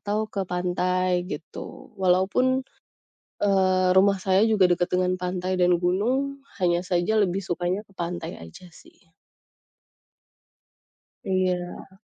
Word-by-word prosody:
atau 205 +1 -2
ke 200 - -2
pantai, 180 0 0
gitu. - - -8
Walaupun, 195 +9 +2 0.8
eee, 185 -2 +3
rumah 195 +1 +5
saya 190 +1 +3
juga 210 -4 +4
dekat 175 0 +1
dengan 180 0 +2
pantai 180 +1 -3
dan 180 -1 +4
gunung, 255 +10 0 0.2
hanya 175 -2 +2
saja 175 +4 +1
lebih 190 +1 -1
sukanya 180 +2 -2
ke - - -24
pantai 175 -1 -5
aja 80 - -12
sih. - - -19 2.3
Iya. 185 0 -2
185 Hz, 115 wpm, -25 LUFS, 180-195 Hz, 2.3 s, rumah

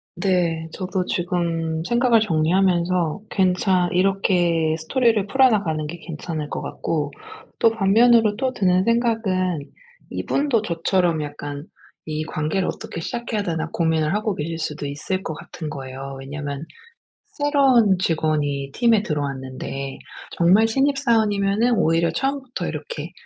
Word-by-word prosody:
네. 170 -4 0
저도 185 -1 -2
지금 170 -2 -1
생각을 240 0 +3
정리하면서 175 -1 +1
괜찮 185 -1 +2
이렇게 175 -4 +2
스토리를 215 +5 +1
풀어나가는 205 - +2
게 170 - -7
괜찮을 155 -2 -5
것 - - -4
같고 150 -3 -3 0.5
또 230 - +5
반면으로 225 +1 +4
또 260 +3 -1
드는 185 -4 +2
생각은 220 -7 +1 0.5
이분도 275 -6 0
저처럼 170 -2 +1
약간 145 0 -6 0.4
'이 155 0 -3
관계를 155 +5 -1
어떻게 170 - -5
시작해야 230 +2 -3
되나.' 165 -3 -2
고민을 160 -1 +1
하고 210 -1 -1
계실 165 +1 -4
수도 150 -2 -4
있을 185 +7 -3
것 160 - -4
같은 155 0 -8
거예요. 135 -1 -7
왜냐면 140 +1 -5 0.7
새로운 270 -9 +4
직원이 150 -5 0
팀에 230 -3 +3
들어왔는데 135 -3 -4 0.4
정말 190 +6 +5
신입사원이면은 230 -4 +2
오히려 165 -1 +2
처음부터 270 -2 -3
이렇게 485 - -6
180 Hz, 305 characters per minute, -22 LUFS, 155-220 Hz, 0.7 s, 또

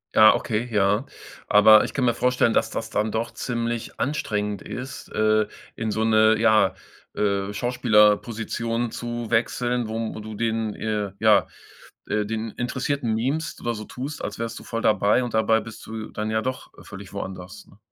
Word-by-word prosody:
Ja, 110 0 +8
okay, 115 +2 -2
ja. 105 +4 +2 0.4
Aber 110 +1 +7
ich - - -5
kann 135 - -1
mir 120 -1 +2
vorstellen, 125 -2 +2
dass - - +1
das 115 0 -4
dann 105 +1 0
doch 115 +1 -2
ziemlich 115 -1 -4
anstrengend 105 -8 -2
ist, 130 +1 -7
äh, 110 0 +2 0.3
in 110 -1 -2
so 110 +1 0
'ne, 110 0 +5
ja, 110 -4 +4 0.4
äh, 100 -1 0
Schauspielerposition 115 +1 +1
zu 120 -1 -5
wechseln, 120 +1 0
wo 110 0 -4
du 110 0 -8
den 110 -1 -1
äh, 105 -2 -2
ja, 110 -2 +4 0.6
äh, 105 0 0
den 110 0 -3
Interessierten 125 0 -2
mimst 140 +8 -2
oder 120 0 -2
so 110 -1 -6
tust, 135 +7 -6
als - - -5
wärst 115 -1 -4
du - - -13
voll 115 0 -4
dabei, 105 +4 +3
und 120 - -6
dabei 110 0 +3
bist 115 -1 -10
du 110 0 -6
dann 110 0 -3
ja 110 0 +1
doch 130 +1 -5
völlig 100 -1 -10
woanders, 95 0 -7
ne? 100 - -20
110 Hz, 170 wpm, -24 LUFS, 105-120 Hz, 0.6 s, Ja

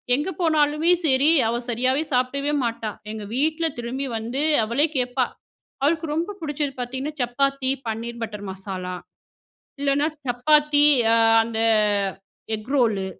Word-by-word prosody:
எங்க 295 +7 -2
போனாலுமே 310 0 +2
சரி 275 +1 +4 0.2
அவ 235 +1 -1
சரியாவே 255 +5 +1
சாப்பிடவே 275 +4 0
மாட்டா 230 -2 -3 0.2
எங்க 220 -1 -6
வீட்ல 315 +4 0
திரும்பி 245 +3 -3
வந்து 235 +5 -2 0.2
அவளே 240 +8 +2
கேட்பா 250 0 +1 0.6
அவளுக்கு 325 +3 +1
ரொம்ப 340 +5 -2
பிடிச்சது 295 -2 -2
பாத்திங்கன்னா 260 +5 -4
சப்பாத்தி 275 +2 0 0.2
பன்னீர் 235 +1 -5
பட்டர் 210 -2 -6
மசாலா, 190 -1 -6 0.9
இல்லனா 280 +1 +1 0.2
சப்பாத்தி 295 +4 +3 0.6
அந்த 225 -1 -5 1.0
எக் 215 +2 -7
ரோலு 220 -7 +1
260 Hz, 120 wpm, -23 LUFS, 230-295 Hz, 1.0 s, சரி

